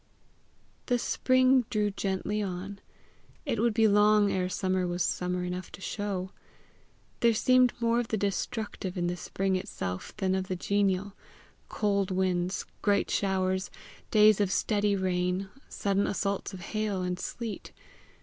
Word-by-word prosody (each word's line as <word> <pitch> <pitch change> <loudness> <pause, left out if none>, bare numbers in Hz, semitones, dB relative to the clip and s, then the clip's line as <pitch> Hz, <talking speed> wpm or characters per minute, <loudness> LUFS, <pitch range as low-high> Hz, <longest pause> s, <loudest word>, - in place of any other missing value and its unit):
The 245 - +2
spring 255 +1 +3
drew 210 -1 +1
gently 195 +2 -2
on. 195 +1 -5 0.7
It 245 -7 -1
would 230 -1 +2
be 225 -1 +5
long 210 0 +4
ere 185 -1 0
summer 185 -1 0
was 175 0 -1
summer 180 0 -1
enough 180 0 -5
to - - -9
show. 195 -2 -3 0.9
There 235 -1 +4
seemed 255 +2 +4
more 235 0 +2
of 240 - -2
the 220 - -1
destructive 200 -1 -3
in 175 - 0
the 175 0 -1
spring 190 +2 -1
itself 90 - -5
than 190 -1 0
of 190 0 -1
the 185 - -2
genial 200 +1 0 0.6
cold 200 -2 0
winds, 185 -1 0 0.2
great 200 -1 +2
showers, 190 -1 0 0.4
days 215 -1 +6
of 195 -2 +1
steady 205 -1 +1
rain, 185 0 -1 0.2
sudden 200 0 0
assaults 200 0 -2
of 190 -2 -9
hail 210 -3 -1
and 180 0 -2
sleet. 225 +2 -5
195 Hz, 145 wpm, -29 LUFS, 185-210 Hz, 0.9 s, days